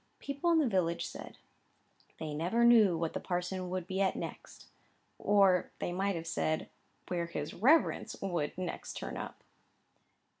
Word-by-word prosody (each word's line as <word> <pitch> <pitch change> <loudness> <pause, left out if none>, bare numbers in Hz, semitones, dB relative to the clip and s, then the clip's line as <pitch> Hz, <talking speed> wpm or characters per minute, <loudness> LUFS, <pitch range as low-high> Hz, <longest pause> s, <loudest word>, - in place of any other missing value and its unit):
People 280 +4 -2
in 335 - +5
the 305 -4 +3
village 180 -5 0
said, - - -9 0.8
"they 155 -2 -5
never 175 +10 +1
knew 220 -7 +6
what 165 -1 -2
the - - -2
parson 180 0 -3
would 185 -1 -3
be 190 +1 -2
at 190 - +2
next;" - - -7 0.5
or 195 -3 +4
they - - -3
might 195 +2 0
have 165 0 -5
said, 155 -1 -1 0.4
"where 170 -2 -1
his 150 -3 -4
reverence 290 - +3
would 175 -6 -2
next 185 -2 -4
turn - - -5
up." - - -7
185 Hz, 155 wpm, -32 LUFS, 170-200 Hz, 0.8 s, knew